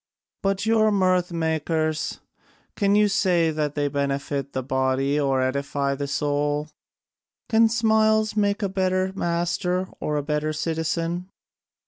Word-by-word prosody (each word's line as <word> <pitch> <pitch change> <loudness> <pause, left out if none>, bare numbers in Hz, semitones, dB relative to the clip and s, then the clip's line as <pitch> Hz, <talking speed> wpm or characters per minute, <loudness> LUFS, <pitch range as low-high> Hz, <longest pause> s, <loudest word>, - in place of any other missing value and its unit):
But 195 +1 0
your 220 -1 +4
mirth 185 -3 +2
makers, 160 -1 -1 0.5
can 200 -1 +2
you 210 0 +5
say 180 -5 +2
they 150 -1 -1
benefit 140 0 -2
the 130 - -3
body 130 +2 0
or 135 -2 +1
edify 140 +1 -1
the 140 +1 -4
soul? 145 +1 -1 0.8
Can 225 0 +5
smiles 220 -1 +2
make 205 0 +1
a - - +2
man 195 - -3
a - - -18
better 185 0 +1
master 180 +1 -1
or 150 - -1
a 145 - -1
better 150 +1 -1
citizen? 165 +3 -2
160 Hz, 135 wpm, -24 LUFS, 145-195 Hz, 0.8 s, you